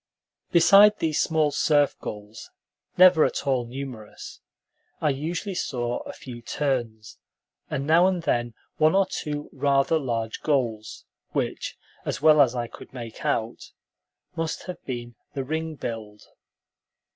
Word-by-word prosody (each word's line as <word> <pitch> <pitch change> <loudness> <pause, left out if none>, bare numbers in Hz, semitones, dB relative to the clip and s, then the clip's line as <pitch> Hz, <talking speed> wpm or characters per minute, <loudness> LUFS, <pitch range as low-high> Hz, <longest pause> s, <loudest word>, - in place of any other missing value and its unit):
Beside 200 +5 +7
these 155 -2 0
small 155 -2 +2
surf 145 -1 +2
gulls, 105 +1 -8 0.5
never 180 -3 +7
at - - -1
all 130 -3 0
numerous, 125 -4 -8 0.6
I 150 - +2
usually 165 +8 -3
saw 120 -8 -2
a - - -8
few 120 -3 -10
terns, 120 -5 -3 0.5
and 140 - -2
now 165 +4 +5
and 180 -3 -1
then 120 -6 0 0.2
one 155 +3 +4
or 195 0 +4
two 150 -5 -4
rather 140 +3 +2
large 115 -5 -3
gulls, 120 -7 -1 0.3
which, - - -2 0.3
as - - -3
well 155 0 +6
as 130 -3 +3
I 120 -1 -1
could - - -12
make 115 -3 -8
out, 115 +1 -2 0.6
must 165 -1 -3
have 180 - -8
been 120 -2 -5 0.2
the 135 - -2
ring 160 +3 -3
billed. 110 -5 -6
140 Hz, 135 wpm, -25 LUFS, 120-160 Hz, 0.6 s, Beside